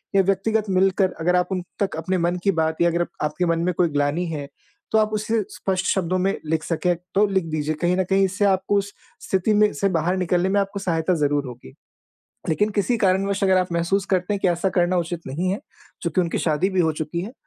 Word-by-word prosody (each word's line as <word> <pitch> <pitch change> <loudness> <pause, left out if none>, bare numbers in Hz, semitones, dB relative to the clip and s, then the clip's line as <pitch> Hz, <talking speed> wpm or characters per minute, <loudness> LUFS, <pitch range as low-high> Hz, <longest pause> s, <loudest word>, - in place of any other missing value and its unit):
या 195 - +6
व्यक्तिगत 205 +3 +1
मिलकर 190 0 +2
अगर 180 +2 +2
आप 180 - +2
उन 185 -2 -1 0.2
तक 195 -4 0
अपने 185 +4 -1
मन 175 +1 0
की 200 - +3
बात 160 0 0
या 170 - +5
अगर 170 +1 0
अप 175 - -1 0.2
आपके 180 +4 -1
मन 165 -1 +1
में 180 - +1
कोई 175 -2 +3
ग्लानि 145 +4 0
है 145 -2 -5 0.4
तो 220 - +3
आप 215 0 +2
उसे 215 +1 0
स्पष्ट 190 -1 -2
शब्दों 185 -1 0
में 195 - +1
लिख 160 0 -1
सकें 175 +1 0 0.2
तो 205 +2 +5
लिख 190 -3 0
दीजिए। 155 0 -1
कहीं 175 +1 +2
न 190 - +2
कहीं 195 0 +4
इससे 200 +2 0
आपको 195 +1 +2
उस 200 0 -2 0.3
स्थिति 190 +3 +1
में 210 0 +4
से 200 - 0
बाहर 175 +1 0
निकलने 180 0 +1
में 200 - +2
आपको 195 +1 -4
सहायता 170 -2 0
ज़रूर 145 0 +1
होगी। 120 - -11 0.8
लेकिन 205 +7 +1
किसी 235 +5 +2
कारणवश 195 +1 +1
अगर 190 -1 +4
आप 180 -1 -1
महसूस 170 +3 0
करते 185 +2 +1
हैं - - -2
कि 185 - +2
ऐसा 175 +2 +1
करना 175 +1 +3
उचित 170 0 -3
नहीं 170 +7 -2
है 200 - -3 0.4
चूँकि 170 +1 +1
उनकी 170 -2 -1
शादी 165 +4 +1
भी 190 -1 +1
हो 160 -2 +2
चुकी 155 +2 -3
है 210 +6 -7
185 Hz, 235 wpm, -23 LUFS, 170-195 Hz, 0.8 s, या